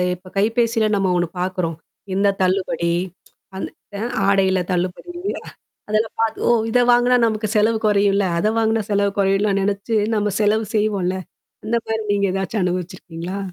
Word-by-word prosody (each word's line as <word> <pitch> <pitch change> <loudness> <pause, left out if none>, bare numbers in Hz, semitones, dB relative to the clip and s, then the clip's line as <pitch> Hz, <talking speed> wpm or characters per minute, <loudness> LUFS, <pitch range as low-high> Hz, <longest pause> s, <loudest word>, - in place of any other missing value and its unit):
இப்ப 180 +1 -17
கைபேசில 225 +1 +2
நம்ம 195 -2 +1
ஒன்னு 175 0 +1
பாக்குறோம். 180 -3 -2 0.4
இந்த 200 +2 +2
தள்ளுபடி. 185 -2 +1 0.6
அந்த 190 - -4 0.3
அ - - -4 0.3
ஆடையில 190 -1 +3
தள்ளுபடி. 180 - -2 0.8
அதில 215 +1 +2
பா 225 - +5 0.2
ஓ! - - +4 0.2
இத 245 - +3
வாங்குனா 245 +1 +4
நமக்கு 215 -1 -1
செலவு 220 +2 +3
குறையும்ல. 200 -1 +3
அத 170 - 0
வாங்குனா 225 0 +2
செலவு 200 -1 +2
குறையும்லாம் 195 0 +2
நினச்சு 205 +3 -1 0.2
நம்ம 210 -1 0
செலவு 215 +1 +2
செய்வோம்ல. 200 -4 0 0.5
அந்தமாரி 225 0 -1
நீங்க 200 -1 +1
ஏதாச்சும் 195 +2 -1
அனுபவிச்சிருக்கீங்களா? 180 0 -4
200 Hz, 140 wpm, -21 LUFS, 185-220 Hz, 0.8 s, பா